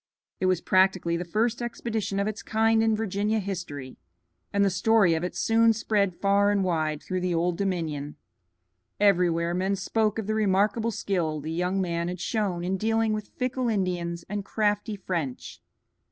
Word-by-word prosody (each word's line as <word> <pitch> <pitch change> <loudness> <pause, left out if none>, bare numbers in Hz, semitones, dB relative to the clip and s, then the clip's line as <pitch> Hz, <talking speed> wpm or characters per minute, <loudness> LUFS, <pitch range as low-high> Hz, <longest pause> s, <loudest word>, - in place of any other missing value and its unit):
It 185 - +1
was 185 -2 +2
practically 185 -2 +2
the 170 - -2
first 220 +7 0
expedition 225 -4 -3
of 200 - +1
its 215 0 -4
kind 225 0 +2
in 225 -1 +3
Virginian 210 0 0
history, 165 -9 -6 0.5
and 200 0 +3
the 195 - +2
story 195 -1 +3
of 160 +1 -1
it 180 - -3
soon 225 0 +4
spread 205 -4 0
far 200 +1 +3
and 205 -1 +2
wide 155 -4 -1
through 185 0 -3
the 180 -1 0
Old 170 +1 +1
Dominion. 160 -7 -2 0.8
Everywhere 175 -4 +3
men 190 +2 0
spoke 215 +3 0
of 220 - -3
the 215 - -1
remarkable 210 +2 +2
skill 175 -7 -1
the 155 +2 -5
young 180 +3 0
man 170 -2 -1
had 180 0 -4
shown 190 -3 -1
in 185 +2 -1
dealing 225 +1 +1
with 215 -1 -4
fickle 255 -1 -1
Indians 175 -4 -2
and 205 0 -3
crafty 210 +1 0
French. 170 -9 -4
195 Hz, 170 wpm, -26 LUFS, 175-215 Hz, 0.8 s, soon